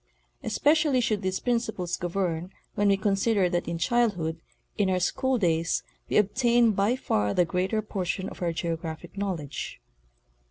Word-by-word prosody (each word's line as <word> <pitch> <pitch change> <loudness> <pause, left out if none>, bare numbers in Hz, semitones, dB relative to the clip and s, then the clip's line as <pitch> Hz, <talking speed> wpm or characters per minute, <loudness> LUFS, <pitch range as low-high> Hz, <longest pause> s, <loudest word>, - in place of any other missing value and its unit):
Especially 300 -3 +2
should 220 -4 0
these 190 -1 -1
principles 220 -7 -1
govern 175 -1 -2 0.2
when 205 -1 +1
we 200 -1 +4
consider 200 0 +2
that 175 0 -1
in 170 0 -2
childhood, 175 -7 0 0.3
in 200 -2 +1
our 185 -1 +2
school 260 +8 +1
days, 165 -5 +1 0.3
we - - +2
obtain 235 +2 +4
by 205 +4 +2
far 105 - 0
the 180 - +4
greater 190 +5 -1
portion 190 -2 -3
of - - -10
our 175 -1 +1
geographic 165 0 -4
knowledge. 180 - -4
195 Hz, 150 wpm, -27 LUFS, 170-225 Hz, 0.3 s, we